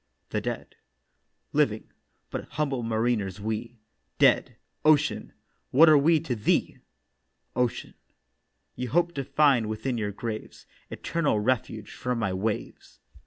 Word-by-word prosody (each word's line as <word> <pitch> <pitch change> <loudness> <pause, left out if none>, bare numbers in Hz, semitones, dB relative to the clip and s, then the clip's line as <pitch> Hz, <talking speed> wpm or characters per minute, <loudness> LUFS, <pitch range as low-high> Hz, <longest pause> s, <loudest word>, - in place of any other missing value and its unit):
THE - - -1
DEAD: - - -5 0.8
'Living, - - +1 0.4
but - - -4
humble 140 -4 -1
mariners 110 -3 -1
we; 110 +3 -4 0.4
Dead, - - +4 0.3
Ocean, 150 -1 +3 0.4
what 155 +6 +7
are 155 -1 +8
we 160 +3 +4
to 125 - -2
thee?' 105 - 0 0.8
OCEAN: 125 -2 -1 0.8
'You 125 0 -4
hoped 170 +5 +2
to 140 - -3
find 135 -5 +3
within 120 +3 -2
your 105 -1 -2
graves 110 +1 -6 0.2
Eternal 150 -10 0
refuge 110 -2 -1
from 125 -1 -2
my 100 -5 -1
waves. 105 +3 -4
120 Hz, 120 wpm, -27 LUFS, 110-140 Hz, 0.8 s, are